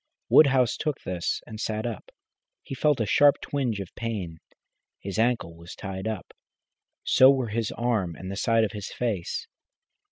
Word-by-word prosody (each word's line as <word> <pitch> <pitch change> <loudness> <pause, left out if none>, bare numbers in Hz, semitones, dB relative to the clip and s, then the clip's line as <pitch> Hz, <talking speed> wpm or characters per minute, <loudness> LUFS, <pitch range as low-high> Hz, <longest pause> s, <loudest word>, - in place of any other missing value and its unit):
Woodhouse 135 -5 +5
took 150 -3 -2
this 90 -2 -3
and 110 - -9
sat 110 0 -2
up. 115 -5 -5 0.5
He - - -7
felt 145 0 +2
a 110 - +1
sharp 145 +7 +5
twinge 125 -7 -2
of 95 -3 -7
pain. 100 -8 -5 0.6
His 100 +2 -5
ankle 115 -8 +1
was 85 +1 -11
tied 95 +1 -5
up, 110 -4 -5 0.7
so 130 - +6
were 130 -4 +2
his 110 0 -2
arm 110 -8 -1
and 95 +3 -7
the - - -4
side 115 +2 +2
of 110 - -1
his 105 -2 -6
face. 105 -8 -3
110 Hz, 165 wpm, -26 LUFS, 95-125 Hz, 0.7 s, so